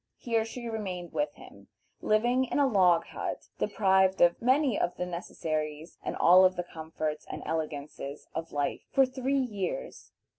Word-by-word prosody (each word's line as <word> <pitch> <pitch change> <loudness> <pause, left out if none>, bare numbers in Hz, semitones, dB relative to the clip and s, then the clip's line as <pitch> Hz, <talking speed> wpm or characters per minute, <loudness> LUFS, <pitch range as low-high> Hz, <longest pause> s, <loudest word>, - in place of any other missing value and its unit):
Here 230 -2 0
she 235 +1 -7
remained 190 -6 -5
with 295 - 0
him, - - -15 0.3
living 240 +4 +2
in 255 - -2
a 285 - +4
log 185 -9 +4
hut, - - -5
deprived 190 -2 +3
of 175 0 +4
many 260 0 +3
of 175 - 0
the 180 - -2
necessaries 155 -3 -4
and - - -4
all 180 +2 +7
of 185 0 +4
the 175 - -2
comforts 155 -2 -5
and - - -6
elegances 150 -2 -4
of 165 +1 -5
life, 145 -1 -1
for 270 - +5
three 260 +1 -1
years. 255 - -3
185 Hz, 160 wpm, -29 LUFS, 160-245 Hz, 0.3 s, all